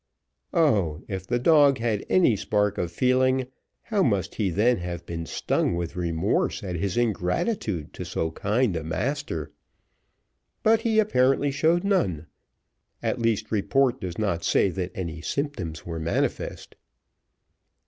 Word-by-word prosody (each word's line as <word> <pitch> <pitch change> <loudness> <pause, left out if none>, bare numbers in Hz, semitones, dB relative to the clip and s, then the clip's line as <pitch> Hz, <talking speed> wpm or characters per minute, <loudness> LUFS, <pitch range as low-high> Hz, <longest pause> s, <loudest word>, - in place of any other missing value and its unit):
Oh, 100 - +2
if 95 -2 -5
the 120 - +1
dog 145 +1 +5
had 115 -3 -1
any 170 -11 +4
spark 105 0 0
of 85 -1 -2
feeling, 130 +5 +2 0.4
how 210 -4 0
must 100 - +1
he 105 -4 0
then 110 +7 +2
have 85 -1 -5
been 85 -1 -5
stung - - 0
with 85 -1 -4
remorse 90 +6 0
at 90 -3 -4
his 95 +5 -2
ingratitude 105 - -1
to - - -6
so 80 - -2
kind 105 +3 0
a 80 - -3
master! 85 - -3 1.1
But 225 +1 +4
he 225 -2 +1
apparently 140 -9 +3
showed 160 +5 +2
none, 95 - +1 0.8
at 125 - -1
least, 110 -2 0
report 125 +5 +1
does 90 -2 -5
not 95 -6 -1
say - - +3
that 90 +1 -4
any 85 -3 -5
symptoms 90 - -3
were 85 -1 -4
manifest. 80 +1 -2
105 Hz, 140 wpm, -25 LUFS, 85-130 Hz, 1.1 s, dog